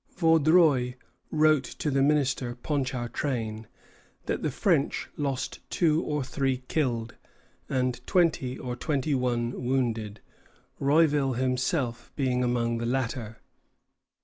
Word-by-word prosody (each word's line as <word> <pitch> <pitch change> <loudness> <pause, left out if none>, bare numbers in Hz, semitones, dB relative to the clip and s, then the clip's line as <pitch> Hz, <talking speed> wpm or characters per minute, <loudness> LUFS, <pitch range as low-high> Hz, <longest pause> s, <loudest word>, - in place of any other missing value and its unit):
Vaudreuil 160 -6 +4 0.3
wrote 155 -2 +4
to 150 +3 -4
the 135 0 +2
minister, 135 -4 +1
Ponchartrain, 120 -4 -3 0.6
that - - -2
the - - 0
French - - +1
lost 140 -2 -3
two 160 -2 +2
or 150 -2 -1
three 130 -1 -1
killed, 120 -7 -1 0.6
and 125 -2 0
twenty 155 -8 +2
or 125 -1 -5
twenty 145 +2 -1
one 120 -2 0
wounded, 115 -5 -1 0.6
Rouville 145 -1 +3
himself 130 -1 -1
being 125 -3 +1
among 120 -1 0
the 115 - -2
latter. 120 -3 -3
130 Hz, 110 wpm, -27 LUFS, 120-145 Hz, 0.6 s, Vaudreuil